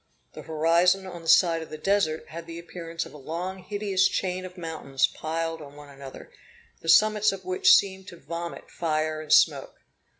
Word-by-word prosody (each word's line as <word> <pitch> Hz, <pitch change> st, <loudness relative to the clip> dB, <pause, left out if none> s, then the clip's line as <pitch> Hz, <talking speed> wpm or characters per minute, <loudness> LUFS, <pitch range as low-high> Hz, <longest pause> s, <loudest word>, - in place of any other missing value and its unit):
The -, -, -9 dB
horizon 170 Hz, +5 st, +2 dB
on 175 Hz, -2 st, -8 dB
the 165 Hz, -, -12 dB
side 165 Hz, 0 st, +5 dB
of 160 Hz, -, -9 dB
the 155 Hz, -, -7 dB
Desert 160 Hz, -2 st, 0 dB
had 165 Hz, +1 st, -8 dB
the 165 Hz, 0 st, -8 dB
appearance 170 Hz, -1 st, -6 dB
of -, -, -13 dB
a 150 Hz, -, -11 dB
long 175 Hz, +7 st, -5 dB
hideous 195 Hz, 0 st, 0 dB
chain 185 Hz, -1 st, -2 dB
of 185 Hz, 0 st, -11 dB
mountains 160 Hz, -6 st, -1 dB
piled 165 Hz, 0 st, -4 dB
on 145 Hz, -1 st, -12 dB
one 145 Hz, -1 st, -13 dB
another, 135 Hz, -1 st, -11 dB, 0.5 s
the 165 Hz, -, -6 dB
summits 215 Hz, +4 st, +5 dB
of 190 Hz, -1 st, -8 dB
which 185 Hz, 0 st, +5 dB
seemed 190 Hz, -1 st, 0 dB
to 175 Hz, -, -10 dB
vomit 170 Hz, 0 st, -7 dB
fire 155 Hz, -1 st, -2 dB
and 155 Hz, -, -9 dB
smoke. -, -, +3 dB
170 Hz, 190 wpm, -26 LUFS, 155-185 Hz, 0.5 s, side